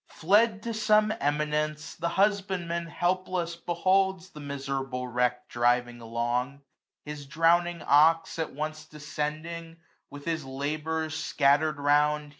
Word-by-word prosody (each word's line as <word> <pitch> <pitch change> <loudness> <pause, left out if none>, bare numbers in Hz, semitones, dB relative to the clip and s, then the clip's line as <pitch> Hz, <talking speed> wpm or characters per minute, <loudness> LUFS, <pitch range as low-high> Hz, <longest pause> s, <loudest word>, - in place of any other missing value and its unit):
Fled 205 +4 +2
to 235 - -3
some 215 0 +3
eminence, 150 +1 -1
the 170 0 -2
husbandman 190 -4 0
Helpless 175 0 -1
beholds 185 +2 0
the 150 - -11
miserable 135 -3 -4
wreck 125 0 0
345 - - -19 0.3
Driving 120 0 -12
along 120 +4 -2
j - - -26 0.4
his 150 -1 -7
drowning 170 +3 +2
ox 165 +3 +4
at 160 - -2
once 155 +2 -5
Descending, 155 +3 -5 0.3
with 145 0 -11
his 165 -2 -2
labours 155 +4 -3
scatter'd 150 0 +2
round. 150 +1 +2
155 Hz, 125 wpm, -28 LUFS, 145-170 Hz, 0.4 s, ox